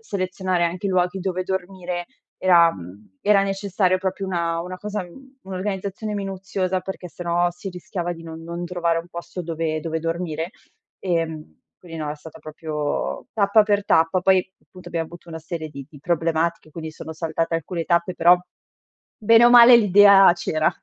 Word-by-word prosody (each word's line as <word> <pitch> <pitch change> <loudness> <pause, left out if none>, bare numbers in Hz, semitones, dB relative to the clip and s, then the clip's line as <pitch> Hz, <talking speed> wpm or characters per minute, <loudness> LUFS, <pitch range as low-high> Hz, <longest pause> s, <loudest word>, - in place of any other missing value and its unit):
selezionare 185 - -2
anche 175 +3 -2
i - - 0
luoghi 180 +1 +1
dove 185 -1 -2
dormire, 180 -2 -4 0.3
era 170 -3 +5
mhmm, 95 +2 -13
era 205 -1 +4
necessario 195 -1 0
proprio 190 +1 -3
una 170 -2 -1
una 180 +2 -6
cosa 210 -1 -4
mhmm, 265 +10 -15
un'organizzazione 195 +2 -4
minuziosa, 190 -1 -2
perché 185 -1 -7
sennò 175 0 0
si 175 +3 -8
rischiava 175 -1 -5
di 165 - -12
non 165 0 -9
non 170 +1 -5
trovare 170 -1 0
un 170 +1 -8
posto 170 +1 -7
dove 160 -1 -2
dove 160 +1 -3
dormire. 165 0 -3 0.5
Ehm, 165 -4 -3 0.2
quindi 165 -2 -10
no, 150 -1 -3
è 150 - -5
stata 155 +1 -13
proprio 155 -1 -4
tappa 210 0 +4
per 205 -1 +1
tappa, 165 +3 +3
poi 190 0 +2 0.2
punto 180 -1 -12
abbiamo 165 -2 -2
avuto 175 +1 -14
una 160 -1 -6
serie 160 -1 -6
di 140 -2 -10
di 150 - -14
problematiche 165 0 -1
quindi 160 0 -7
sono 160 +1 -9
saltate 165 +1 -2
alcune 165 +1 -3
tappe, 170 +1 +1
però 175 +1 +6 0.9
bene 230 +2 +6
o 240 - +7
male 240 0 +9
l'idea 200 -3 +7
c'era. 155 -2 0
175 Hz, 170 wpm, -22 LUFS, 165-190 Hz, 0.9 s, male